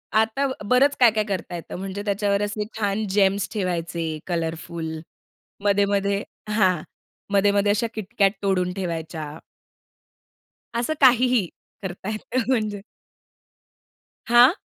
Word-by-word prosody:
आता 220 +6 +2 0.2
बरंच 275 +3 +4
काय-काय 220 -4 +5
करता 190 -3 -3
येतं, 170 - -7
म्हणजे 195 +2 -5
त्याच्यावर 200 0 +1
असे 210 0 -2
छान 205 0 0
Gems 200 0 +3
ठेवायचे 170 -5 -2
कलरफुल. 165 -1 -3 0.6
मध्ये-मध्ये 200 0 +2 0.3
हां, 185 -6 +3 0.5
मध्ये-मध्ये 200 0 +4
अशा 215 +3 +1
KitKat 205 -1 +2
तोडून 180 -2 +1
ठेवायच्या. 165 -4 -5 1.4
असं 240 +6 0
काहीही, 250 -5 +5 0.4
करता 190 +1 -6
येतं 225 +4 -2
म्हणजे. 215 -5 0 1.5
हां? 240 +6 +7
200 Hz, 100 wpm, -24 LUFS, 180-220 Hz, 1.5 s, हां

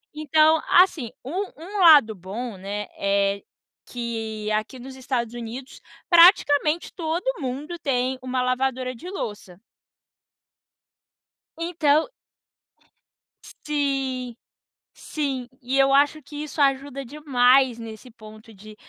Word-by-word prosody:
Então, 310 +1 +3
assim, 340 -10 +4
um 365 +9 -3
um 380 +6 -7
lado 295 - +7
bom, 205 +5 -7
né, 200 +2 -5
é 200 0 0 0.4
que 225 -3 -5
aqui 215 +4 -3
dos 260 +2 -10
Estados 245 -3 -3
Unidos, 240 +3 -8 0.3
praticamente, 335 -3 +5
todo 330 0 -3 0.2
mundo 280 +6 -5
tem 260 -2 -1
uma 255 0 -2
lavadora 255 0 -1
de 335 +10 -9
louça. 205 - -7 2.0
Então 320 -3 +1 1.4
Sim, 270 -4 -3 0.6
sim. 275 -5 -4
E 260 +2 -2
eu 270 0 +4
acho 290 +2 +3
que 290 +2 -13
isso 305 0 -4
ajuda 275 0 0
demais 260 -3 +2
nesse 225 +2 -10
ponto 220 0 -14
de 215 +2 -14
260 Hz, 110 wpm, -23 LUFS, 230-300 Hz, 2.0 s, lado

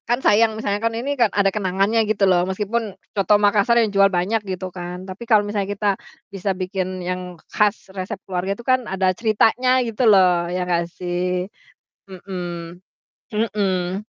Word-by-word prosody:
Kan 240 +1 +2
sayang 220 +1 +4
misalnya 205 -2 -2
kan 230 0 0
ini 270 +5 -2
kan 240 -6 +2
ada 195 -1 +1
kenangannya 200 +2 +1
gitu 205 -2 +2
loh, 180 -2 +4
meskipun 210 +2 -2 0.2
coto 205 0 +2
Makassar 205 +3 +3
yang 215 -3 0
jual 195 0 +5
banyak 195 +4 0
gitu 185 -1 -5
kan. 180 0 -7
Tapi 190 +4 -8
kalau 215 -3 +5
misalnya 205 -1 -2
kita 205 0 0 0.4
bisa 195 0 -2
bikin 185 0 -3
yang 180 -1 -4 0.2
khas 210 -1 +1
resep 185 -1 -5
keluarga 185 0 -2
itu 235 - -12
kan 255 -2 +1
ada 190 -1 +1
ceritanya 225 +4 +2 0.2
gitu 230 +1 -4
loh, 180 -4 +4
ya 180 +1 -2
gak 170 -1 0
sih? 180 0 -2 0.6
Mhm, 175 -2 -7 0.5
mhm. 200 -3 -1
195 Hz, 165 wpm, -21 LUFS, 180-215 Hz, 0.6 s, jual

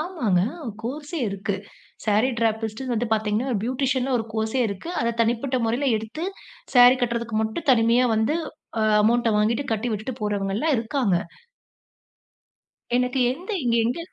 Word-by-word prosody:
ஆமாங்க! 305 - 0 0.4
கோர்ஸ்ஸே 290 +7 -5
இருக்கு. 200 +1 -3 0.5
சாரி 215 +4 +3
டிராபிஸ்டுன்னு 225 +2 -1
வந்து 235 +1 0
பாத்தீங்கன்னா, 220 +3 0 0.2
பியூட்டிஷியன்ல 260 +1 0
ஒரு 225 - -3
கோர்ஸ்ஸே 220 +3 -1
இருக்கு. 200 - -6
அத 235 0 +1
தனிப்பட்ட 240 +3 +1
மொறைல 240 +5 0
எடுத்து, 225 +10 -6 0.5
சாரி 245 +1 +8
கட்றதுக்கு 235 -2 -1
மட்டும் 220 +9 -4
தனிமயா 235 0 +4
வந்து, 220 +8 +1 0.4
அ - - +2 0.2
அமவுண்ட்ட 235 +2 +3
வாங்கிட்டு 225 +6 +1
கட்டி 220 +2 -1
விட்டுட்டு 215 +5 -4
போறவங்கல்லாம் 210 +7 0
இருக்காங்க. 225 -4 0 1.8
எனக்கு 250 +1 +1
எந்த 355 - -8
இங்க 235 -1 +2
எங்க? 245 +7 -1
235 Hz, 130 wpm, -24 LUFS, 220-260 Hz, 1.8 s, சாரி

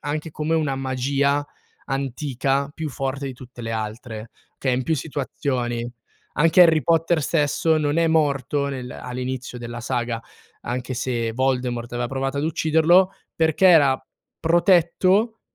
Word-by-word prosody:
anche 150 +2 -4
come 155 +2 -2
una 150 -4 0
magia 140 +2 0 0.4
antica 135 +1 -1
più 160 -1 -4
forte 135 +1 -3
di 135 - -4
tutte 125 -1 -12
le 115 0 -4
altre, 110 0 -5 0.3
che 135 - -3
è - - +1
in 130 +1 0
più 160 - +1
situazioni. 130 -5 -3 0.5
Anche 165 +4 +6
Harry 160 -3 +5
Potter 165 0 +2
stesso 155 +1 +1
non 145 +1 0
è 165 0 +3
morto 145 -3 +1
nel 125 -2 -5
all'inizio 125 0 -5
della 120 0 -6
saga, 120 -1 -2 0.4
anche 125 +1 -4
se 120 -2 -2
Voldemort 125 -2 -1
aveva 120 0 -2
provato 135 +1 -2
ad 145 - -1
ucciderlo, 165 +4 +3 0.2
perché 160 +3 +3
era 145 -7 +5 0.4
protetto 185 +5 +3
140 Hz, 145 wpm, -23 LUFS, 125-160 Hz, 0.5 s, Anche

